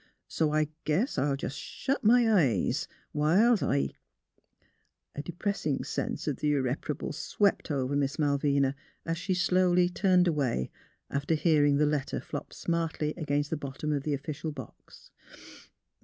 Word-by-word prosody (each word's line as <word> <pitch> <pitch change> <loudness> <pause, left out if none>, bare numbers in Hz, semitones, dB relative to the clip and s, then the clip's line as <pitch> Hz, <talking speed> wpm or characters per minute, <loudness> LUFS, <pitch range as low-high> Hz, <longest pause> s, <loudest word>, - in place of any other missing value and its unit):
So 155 -2 0
I 155 0 +2 0.2
guess 160 - 0
I'll 140 +1 +1
jus' 135 - -4
shet 260 - -3
my 240 +3 +6
eyes, 145 - +2 0.3
whilst 190 +10 +4
I 70 -1 +1 0.6
" - - -43
A - - -3
depressing 175 -4 -2
sense - - -3
of 145 - -1
the 150 -1 +1
irreparable 140 +2 -2
swept 200 -4 0
over 140 -1 -1
Miss 145 0 0
Malvina, 140 -2 +2 0.3
as 165 0 -2
she 185 0 -1
turned - - -2
slowly 180 -1 +3 0.3
away, 140 - 0 0.4
after 145 +3 0
hearing 150 -2 +3
the 150 - +3
letter 150 -2 -1
flop - - -7
smartly 165 -2 -2
against 145 -3 -1
the 160 - 0
bottom 145 +2 -3
of 145 - 0
the 145 +1 -1
official 150 +3 -5
box. 135 -3 -12
150 Hz, 145 wpm, -29 LUFS, 140-170 Hz, 0.6 s, my